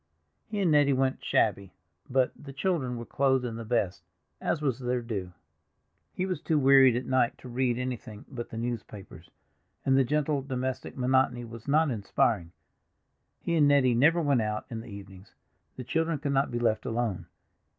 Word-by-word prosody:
He 210 -1 -4
and 175 -4 +3
Nettie 145 -2 +4
went 130 0 0
shabby, 100 -1 +1 0.4
but 130 0 +2
the 140 -2 -11
children 135 -5 -1
were 120 - -6
clothed 130 -1 +1
in 115 -2 -4
the 115 - -6
best, 105 -5 -1 0.4
as - - 0
was 135 -5 -1
their 125 -1 -1
due. 100 -6 -4 0.8
He 185 - -2
was 185 -5 -3
too 160 -2 +1
wearied 135 -3 +6
at 125 - -2
night 130 -2 +1
to - - -12
read 125 0 0
anything 125 -4 -5
but 120 -3 -7
the 115 - -7
newspapers, 105 -7 -6 0.6
and 135 -1 +4
the 135 - +5
gentle 150 +1 0
domestic 130 -2 -4
monotony 125 -1 +1
was 115 +1 -11
not 150 +1 +3
inspiring. 100 -4 0 0.9
He 170 - -2
and 150 -3 +5
Nettie 140 -3 +4
never 160 +8 +4
went 140 -5 +2
out 105 0 -2
in 115 -1 -4
the 120 - -11
evenings; 100 -1 -12 0.4
the 130 - -6
children 160 +5 0
could 140 0 -2
not 135 +1 +2
be 120 - -3
left 115 -2 0
alone. 115 -5 -2
125 Hz, 180 wpm, -28 LUFS, 115-140 Hz, 0.9 s, wearied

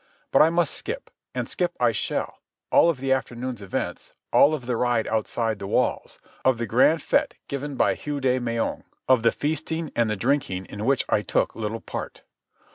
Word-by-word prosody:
But - - +6
I 155 - +7
must 170 -2 +1
skip. - - -5 0.2
And - - -2
skip 175 -1 -1
I 120 -1 +4
shall, - - -3 0.3
all 170 - +6
of 165 - 0
the 135 0 -1
afternoon's 125 -2 -3
events, 100 -2 -4 0.2
all 155 +2 +6
of 130 -5 -8
the 125 0 -1
ride 120 -1 +1
outside 110 0 -1
the 100 - -5
walls, - - 0 0.3
of 130 -2 +3
the 115 - -2
grand 130 +9 +4
fête - - +1
given 140 0 -4
by - - +3
Hugh 145 -1 -4
de 130 -1 +2
Meung, 115 -2 -2 0.2
of 130 -3 +5
the 115 - +4
feasting 160 +1 -2
and 115 -2 +2
the 105 - 0
drinking 115 -5 0
in 105 +3 -6
which 135 -1 +2
I 105 - +2
took - - 0
little 110 0 -3
part. - - -6
125 Hz, 195 wpm, -25 LUFS, 115-145 Hz, 0.3 s, I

